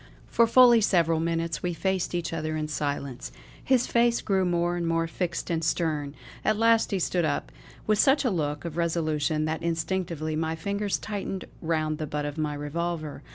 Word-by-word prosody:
For 230 - +3
fully 240 -1 +7
several 170 -5 +3
minutes 165 0 -1
we 175 -1 -2
faced 190 0 -1
each 170 -1 -2
other 155 -1 -2
in 155 0 -2
silence. 140 -4 -3 0.3
His 255 -2 +3
face 235 0 +2
grew 190 -2 +1
more 175 0 +1
and 170 -1 -2
more 165 0 +1
fixed 170 +1 -3
and 165 -1 0
stern; 155 -3 -1 0.3
at 215 - +2
last 230 0 +4
he 200 - 0
stood 180 -1 0
up 150 -2 -1 0.3
with 215 -1 +2
such 280 +1 +4
a 250 - +2
look 150 -3 -2
of 170 -1 -5
resolution 155 -2 0
that 160 +1 -2
instinctively 165 -1 -2
my 160 +1 -1
fingers 200 +4 -1
tightened 195 -2 -5 0.2
round 155 -2 -1
the 155 - -3
butt 150 0 -3
of 145 +1 -5
my 150 -1 -1
revolver. 155 +1 -4
165 Hz, 185 wpm, -27 LUFS, 155-190 Hz, 0.3 s, fully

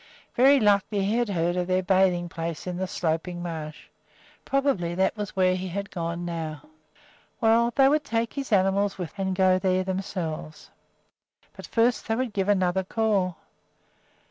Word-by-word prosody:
Very 270 +3 +6
likely 205 -1 +2
he 210 +3 0
had 240 -2 0
heard 175 -2 0
of 180 -1 -1
their 185 0 +1
bathing 185 -2 +2
place 165 -1 -5
in 180 -1 -4
the 190 +1 -2
Sloping 175 +1 -2
Marsh. 155 -3 -6 0.6
Probably 270 -12 0
that 190 +3 +1
was 210 -2 -5
where 185 -1 +3
he 185 +1 -4
had 200 +3 -5
gone 170 0 -4
now. 160 -4 -5 0.7
Well, 230 +1 +3
they 270 -1 +6
would 300 +2 +2
take 230 -2 -2
his 275 -3 -5
animals 195 0 +2
with 180 -1 -6
them 195 -1 -2
and 190 - -1
go 185 -1 +3
there 185 0 +1
themselves; 185 -5 -5 0.8
but - - -10
first 235 +1 +1
they 225 - +1
would 250 -2 -2
give 195 -1 -1
another 190 -1 +2
call. 195 -4 0
190 Hz, 170 wpm, -26 LUFS, 175-210 Hz, 0.8 s, Very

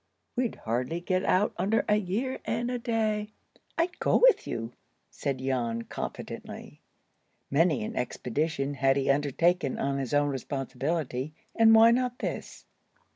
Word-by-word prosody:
We'd 245 -2 0
hardly 125 +8 -2
get 185 +2 0
out 200 +3 +2
under 200 +5 +1
a 210 - +4
year 215 +7 -2
and 235 +2 -1
a 250 - -2
day." 220 -3 0 0.5
"I'd 340 +2 0
go—with - - +4
you," 115 +1 -4 0.4
said 140 -2 -2
Jan, 120 -3 -1
confidently. - - -7 0.7
Many 150 -3 +3
an - - -5
expedition 140 +3 -2
had 135 -1 +2
he 140 0 +2
undertaken 145 +3 +1
on 140 0 -1
his 135 +1 -2
own 145 0 +3
responsibility, 135 +2 -3 0.2
and 225 -1 +7
why 225 +1 +8
not 250 0 0
this? - - -5
160 Hz, 135 wpm, -28 LUFS, 135-220 Hz, 0.7 s, why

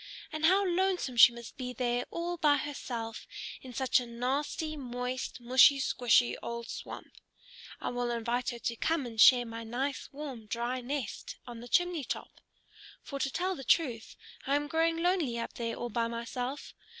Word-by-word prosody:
And 310 0 0
how 390 +3 +4
lonesome 360 -7 0
she 235 +1 +9
must 235 +3 -10
be 250 -2 -4
there 245 0 -1
all 345 +1 -3
by 300 -3 +4
herself 235 -6 -5 0.3
in 260 - -9
such 260 +1 +2
a 245 - -6
nasty, 275 +6 -2
moist, 250 -1 -4
mushy 255 +3 +6
squshy 245 -2 +3
old 235 0 -5
swamp! - - -8 0.6
I - - -3
will 245 0 -2
invite 240 +1 -1
her 240 - -5
to 235 0 -2
come 320 0 0
and 225 -3 -1
share 245 +1 +8
my 230 0 -6
nice, 255 +5 -3
warm, 270 -6 -7
dry 240 +3 -2
nest 260 -2 -4
on 240 -2 -8
the 240 - -9
chimney 355 +2 +2
top. - - -6 0.6
For 280 - -6
to 270 - 0
tell 370 +6 -1
the 270 - -8
truth, 245 -5 +1 0.3
I 275 - +3
am 290 0 +1
growing 330 +1 +1
lonely 345 -10 +1
up 230 - -4
there 230 -1 -3
all 240 - -4
by 230 +2 0
myself. 245 +4 -4
250 Hz, 175 wpm, -31 LUFS, 235-295 Hz, 0.6 s, she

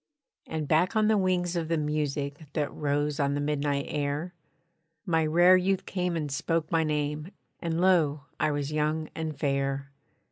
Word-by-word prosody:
And 155 -2 -3
back 165 +7 +2
on 215 0 +3
the 220 - +4
wings 180 -2 +1
of 165 -2 -1
the 165 0 +1
music 150 0 -2
That 150 -2 -1
rose 145 0 -1
on 140 0 +1
the - - -1
midnight 145 -1 0
air, 150 +4 -2 0.7
My 165 -4 +2
rare 175 +4 +6
youth 190 +1 +1
came 180 -2 -1
and 150 -3 -3
spoke 160 +3 -1
my 165 -1 +3
name, 150 0 -1 0.3
And 165 -1 -2
lo! 165 -6 +3 0.2
I - - +2
was 145 -1 -2
young 155 +1 0
and 160 -2 -4
fair. 140 -1 -1
155 Hz, 170 wpm, -28 LUFS, 145-170 Hz, 0.7 s, rare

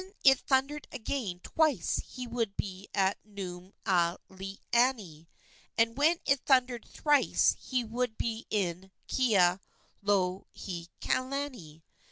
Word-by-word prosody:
When 380 +1 -17
it 270 -2 +7
thundered 275 +2 0
again 220 -7 -3
twice 295 - +1
he 255 -1 -7
would 230 -4 -2
be 190 0 -5
at 195 -1 +1
Nuumealani, 190 +1 -1 0.5
and 230 0 +3
when 310 +5 +4
it 275 -1 +3
thundered 250 -3 +2
thrice 295 -2 +3
he 255 -2 -1
would 235 0 -2
be 225 0 -3
in 190 -2 -1 0.2
Kealohilani. 190 - -1
220 Hz, 100 wpm, -30 LUFS, 185-260 Hz, 0.5 s, it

